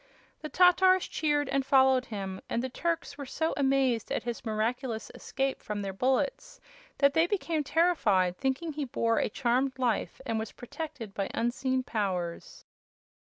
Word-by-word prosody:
The 305 - -5
Tatars 370 +1 +5
cheered 295 -2 0
and 270 0 0
followed 265 -1 +4
him, 195 -3 -5
and 235 - -1
the 260 - -2
Turks 325 0 -3
were 280 - -4
so 320 +5 -1
amazed 265 -5 +1
at - - -1
his 235 -1 -4
miraculous 225 +1 -2
escape 270 0 -3
from 205 -1 -4
their 195 -1 -4
bullets 265 - -1 0.4
that 280 -1 +4
they 325 +3 +4
became 335 -6 -1
terrified, 230 - +2
thinking 275 - -2
he 295 0 -3
bore 230 -3 +1
a - - 0
charmed 260 +3 0
life 245 -5 -1
and 225 -4 -1
was 220 -1 -5
protected 245 -5 -7
by 195 -1 -2
unseen 260 +2 0
powers. 185 -7 -3
260 Hz, 155 wpm, -29 LUFS, 225-290 Hz, 0.4 s, Tatars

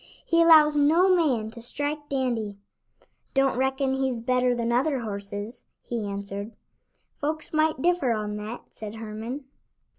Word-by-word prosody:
"He 335 0 +3
allows 310 -2 +7
no 330 +6 +5
man 250 -11 +1
to 235 0 -10
strike 290 +4 -3
Dandy." 235 -7 -1 0.8
"Don't 270 -2 +3
reckon 265 +1 +1
he's 265 -3 0
better 250 +1 +2
than 235 0 -1
other 260 +2 +1
horses," 205 +2 -5 0.2
he 230 -4 -3
answered. 200 +2 -5 0.7
"Folks 310 +2 -3
might 310 -3 +2
differ 350 -8 +2
on 210 -2 -2
that," 215 +3 -6
said 215 0 -8
Herman. 225 +5 -6
250 Hz, 140 wpm, -26 LUFS, 220-290 Hz, 0.8 s, allows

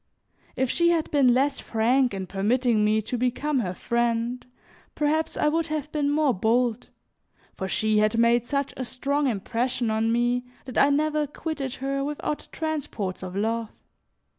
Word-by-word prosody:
If 260 -1 0
she 340 0 +3
had 330 -2 +1
been 275 -4 +5
less 275 +3 +2
frank 245 +3 +2
in 190 -1 -4
permitting 215 +4 +1
me 215 +1 +2
to 245 +3 -3
become 260 +3 0
her 185 -6 -2
friend, 235 +2 -1 0.5
perhaps 310 +2 0
I - - +2
would 325 +2 +1
have 305 -1 -3
been 290 -2 0
more 295 -2 +2
bold, 230 +4 +1 0.7
for 190 - -4
she 215 +2 +1
had 215 +2 +2
made 235 0 +4
such 280 -1 -1
a 260 - -4
strong 280 +3 -1
impression 235 +2 -1
on 220 +1 +1
me, 240 +1 +1 0.2
that 255 - -2
I 280 - +6
never 300 +1 +1
quitted 285 -3 -4
her 275 +1 -2
without 295 +1 -3
transports 290 - -3
of 185 0 -6
love. 225 +2 -1
250 Hz, 165 wpm, -25 LUFS, 225-290 Hz, 0.7 s, I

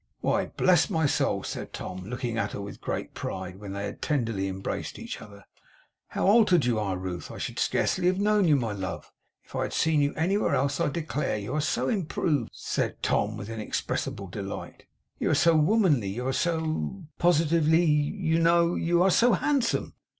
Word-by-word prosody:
'Why, - - +1
bless 180 -1 +3
my 160 -5 +1
soul!' 145 - +1
said - - -6
Tom, 90 0 -6
looking 120 +1 -3
at 115 - -1
her - - -4
with 100 0 -8
great - - -4
pride, 95 0 -5
when 100 -2 -7
they 100 +1 -3
had 100 - -7
tenderly 115 -10 0
embraced 95 0 -4
each - - -7
other, 100 -1 -13 0.6
'how - - -2
altered 200 - +5
you 120 -3 +1
are 95 -3 -1
Ruth! 90 -1 -5
I - - -8
should - - -4
scarcely 180 -1 +1
have 185 +1 +2
known 210 -2 +3
you, 150 - +5
my 120 -5 -1
love, 95 -4 -5 0.3
if - - -13
I - - 0
had - - -2
seen 160 -2 +2
you 145 0 0
anywhere 190 +6 +1
else, 140 +1 0
I - - +2
declare! 150 -5 -2
You 105 +5 -5
are 155 - +1
so 150 - 0
improved,' 160 - 0
said - - -3
Tom, - - +1
with 100 - -7
inexpressible 105 -2 -3
delight; 95 +2 -7 0.3
'you - - 0
are - - +3
so 165 -1 +4
womanly; 155 - +3
you 120 +6 -4
are 130 - 0
so 160 +5 -1 0.2
positively, 165 -1 +3
you 160 +2 +1
know, 170 +1 +4
you 175 +1 +2
are 190 - +4
so 240 +5 +4
handsome! 265 +5 0
150 Hz, 190 wpm, -27 LUFS, 105-175 Hz, 0.6 s, altered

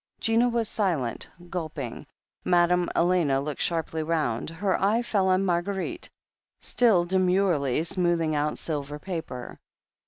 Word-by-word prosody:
Gina 230 +2 +3
was 235 -2 0
silent, 165 - -1 0.2
gulping. 155 -8 -5 0.4
Madame 175 0 +3
Elena 170 -6 +2
looked 145 +1 -4
sharply 160 -1 -1
round. 155 -8 -1
Her 185 +4 -1
eye 215 +5 +2
fell 200 -5 +1
on 185 +1 +2
Marguerite, 185 +2 -2 0.5
still 215 -8 +4
demurely 180 -6 +2
smoothing 170 -2 0
out 150 0 0
silver 145 -2 -4
paper. 160 -7 -6
175 Hz, 120 wpm, -26 LUFS, 155-190 Hz, 0.5 s, still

